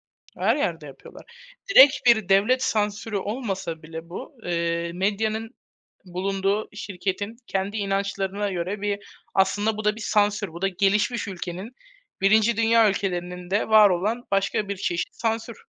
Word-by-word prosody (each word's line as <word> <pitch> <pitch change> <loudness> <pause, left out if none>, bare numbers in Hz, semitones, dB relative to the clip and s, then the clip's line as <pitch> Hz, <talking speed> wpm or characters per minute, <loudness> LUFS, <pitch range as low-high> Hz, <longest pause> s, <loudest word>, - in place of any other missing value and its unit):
Hı - - -22
hı. - - -1
Her 225 +6 +4
yerde 170 - -2
yapıyorlar. 135 -1 -13 0.5
Direkt 280 -8 +9
bir 220 -5 +5
devlet 210 +7 +3
sansürü 210 -2 -1
olmasa 195 -6 -4
bile 160 +1 -9
bu, 255 - -8
eee, 170 -1 -1
medyanın 215 +5 -1 0.5
bulunduğu, 195 +3 -1
şirketin 200 +2 -4
kendi 195 +2 -2
inançlarına 200 0 -1
göre 185 +3 -3
bir, 205 0 -1 0.4
aslında 205 +3 +2
bu 215 - -5
da 210 0 +2
bir - - -9
sansür. 205 -1 +1
Bu 170 +2 -9
da 195 - +3
gelişmiş 200 +4 +1
ülkenin, 190 +4 -6 0.5
1. 215 +3 +4
dünya 225 -1 +4
ülkelerinin 180 -2 -4
de 200 +2 +1
var 215 -2 +7
olan 210 +7 -1
başka 195 +1 0
bir 200 - -3
çeşit 175 -2 -2
sansür. 225 0 -3
200 Hz, 150 wpm, -24 LUFS, 185-215 Hz, 0.5 s, Direkt